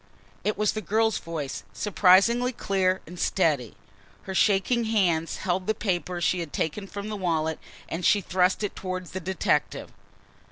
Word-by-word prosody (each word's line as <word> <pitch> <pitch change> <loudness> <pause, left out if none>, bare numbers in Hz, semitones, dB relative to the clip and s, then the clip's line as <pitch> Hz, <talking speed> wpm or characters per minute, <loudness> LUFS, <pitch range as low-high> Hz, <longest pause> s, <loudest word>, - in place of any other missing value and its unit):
It 210 - 0
was 210 -1 +2
the 215 - -3
girl's 220 +3 +1
voice, 145 -11 -5
surprisingly 210 - +4
clear 190 -5 0
and 175 +2 -10
steady. 150 - +1 0.5
Her 190 - -6
shaking 210 +5 +2
hands 180 -7 +1
held 185 0 -2
the 220 - +1
paper 180 -3 -2
she 175 +1 +1
had 165 -4 -5
taken 195 +6 -2
from 205 +1 -6
the 215 - -3
wallet 160 -4 -1 0.3
and 170 +2 -4
she 205 - +5
thrust 185 +1 +1
it 205 - -3
toward 185 -1 -4
the 185 - -5
detective. 180 -9 -1
185 Hz, 160 wpm, -26 LUFS, 170-210 Hz, 0.5 s, she